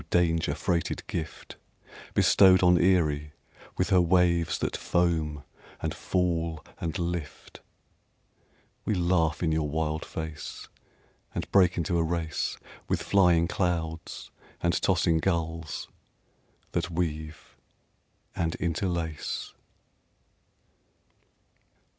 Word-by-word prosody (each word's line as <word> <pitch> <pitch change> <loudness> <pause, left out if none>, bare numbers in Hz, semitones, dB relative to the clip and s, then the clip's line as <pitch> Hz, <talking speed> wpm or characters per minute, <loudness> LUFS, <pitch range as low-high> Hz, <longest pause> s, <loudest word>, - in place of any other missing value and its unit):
danger 85 -2 +2
freighted 85 -3 -1
gift 80 -2 -6 0.6
Bestowed 95 -2 +6
on 90 -1 +5
Erie 75 -5 +2 0.4
with 90 +3 0
her 90 -1 +6
waves 85 -1 +3
that - - -2
foam 80 -4 0 0.4
and - - -2
fall 85 -3 -1
and 85 +2 -3
lift, 85 -4 -5 1.2
We 105 - 0
laugh 85 -3 +1
in 80 - +2
your 80 -1 0
wild 80 +1 -1
face, 80 -1 -6 0.7
And - - -4
break 90 -2 +4
into 85 0 0
a - - +3
race 80 -1 -2 0.3
With - - 0
flying 90 -4 +4
clouds 85 -3 -2 0.3
and 85 0 +1
tossing 85 -3 +2
gulls 80 -2 -2 0.8
that - - -1
weave 80 -2 -4 0.8
and 80 -1 -1
interlace. 85 -3 -2
85 Hz, 100 wpm, -28 LUFS, 80-90 Hz, 1.2 s, Bestowed